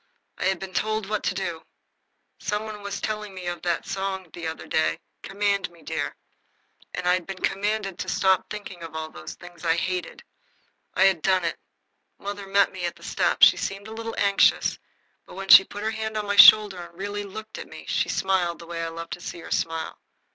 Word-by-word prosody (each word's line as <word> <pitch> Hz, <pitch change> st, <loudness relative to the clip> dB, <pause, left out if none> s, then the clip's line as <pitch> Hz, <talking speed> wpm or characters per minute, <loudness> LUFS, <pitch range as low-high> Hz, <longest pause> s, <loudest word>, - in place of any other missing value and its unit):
I -, -, -1 dB
had 190 Hz, 0 st, +2 dB
been 190 Hz, -1 st, -8 dB
told 215 Hz, 0 st, -1 dB
what 215 Hz, 0 st, -1 dB
to 185 Hz, -, 0 dB
do. 175 Hz, -4 st, -3 dB, 0.8 s
Some 210 Hz, +1 st, -2 dB
one 215 Hz, -1 st, -7 dB
was 200 Hz, 0 st, -4 dB
telling 210 Hz, -2 st, -4 dB
me 185 Hz, -1 st, -7 dB
of 175 Hz, 0 st, -4 dB
a 175 Hz, -1 st, 0 dB
song 190 Hz, -3 st, -3 dB
the 170 Hz, -1 st, -5 dB
other 160 Hz, -, -6 dB
day, 80 Hz, 0 st, +1 dB, 0.2 s
"Command 200 Hz, -1 st, 0 dB
me, 170 Hz, -1 st, -19 dB
dear." -, -, -3 dB, 0.8 s
I 180 Hz, 0 st, +2 dB
had 180 Hz, -2 st, -1 dB
been 195 Hz, -1 st, -5 dB
commanded 195 Hz, -1 st, -1 dB
to -, -, -3 dB
stop 190 Hz, -1 st, +2 dB
thinking 200 Hz, -4 st, -7 dB
of 165 Hz, -1 st, -8 dB
all 160 Hz, 0 st, -4 dB
those 80 Hz, -, -9 dB
things 175 Hz, -1 st, -13 dB
I 165 Hz, -1 st, +3 dB
hated. 180 Hz, +1 st, -3 dB, 0.7 s
I -, -, +4 dB
had 190 Hz, -4 st, +4 dB
done 185 Hz, -1 st, +2 dB
it. 165 Hz, -, -2 dB, 0.6 s
Mother 200 Hz, 0 st, -6 dB
met 200 Hz, +1 st, +3 dB
me 185 Hz, -1 st, -7 dB
at 170 Hz, -, -3 dB
the -, -, -17 dB
steps. -, -, +4 dB
She -, -, +5 dB
seemed 195 Hz, +1 st, -4 dB
a 220 Hz, -, -8 dB
little 225 Hz, 0 st, -5 dB
anxious, 200 Hz, -1 st, +3 dB, 0.5 s
but -, -, -12 dB
when 195 Hz, 0 st, -7 dB
she -, -, +13 dB
had -, -, -15 dB
put 205 Hz, -, -6 dB
her 220 Hz, -, 0 dB
hand 220 Hz, 0 st, -3 dB
on 210 Hz, -, -2 dB
my 205 Hz, 0 st, -1 dB
shoulder 205 Hz, -2 st, +9 dB
and 170 Hz, 0 st, -12 dB
really 205 Hz, +2 st, -3 dB
looked 215 Hz, +2 st, -8 dB
at -, -, -7 dB
me -, -, -11 dB
she -, -, 0 dB
smiled 185 Hz, -3 st, +1 dB
the 170 Hz, -, -11 dB
way 165 Hz, 0 st, -4 dB
I -, -, -2 dB
love 165 Hz, 0 st, -8 dB
to 175 Hz, -, -5 dB
see 175 Hz, -, -6 dB
her -, -, -11 dB
smile. 165 Hz, -1 st, -2 dB
190 Hz, 220 wpm, -25 LUFS, 175-205 Hz, 0.8 s, she